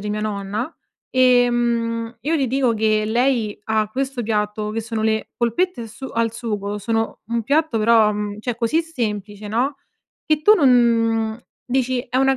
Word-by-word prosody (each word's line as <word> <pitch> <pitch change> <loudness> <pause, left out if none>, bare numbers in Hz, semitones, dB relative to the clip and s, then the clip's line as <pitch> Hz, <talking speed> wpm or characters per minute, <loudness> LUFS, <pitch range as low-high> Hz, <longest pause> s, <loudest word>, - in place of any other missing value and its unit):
di 210 +1 -4
mia 210 0 -2
nonna 210 +6 -3 0.4
e, 250 -1 +4
mhmm, 230 -1 -1
io 305 +7 0
gli 275 -4 +1
dico 255 -1 +1
che 215 0 +1
lei 235 -1 +1
ha 215 -1 0
questo 265 0 -2
piatto 210 -1 -1
che 225 +1 -2
sono 220 0 -4
le 220 0 0
polpette 240 +3 0
su 230 +5 -11
al 230 -2 -1
sugo 210 -3 -4
sono 225 +2 -2
un 230 0 -1
piatto, 285 -1 +1
però, 220 -1 +4
mhmm, 210 0 -4
cioè, 240 +2 -3
così 240 +8 +1
semplice, 210 -8 -4
no, 255 +6 0 0.5
che 310 -1 +1
tu 425 +4 +7
non 290 -9 +4
mhmm, 230 -2 +2 0.3
dici: 255 0 0
"È 255 - -2
una 270 0 +3
230 Hz, 175 wpm, -21 LUFS, 215-255 Hz, 0.5 s, tu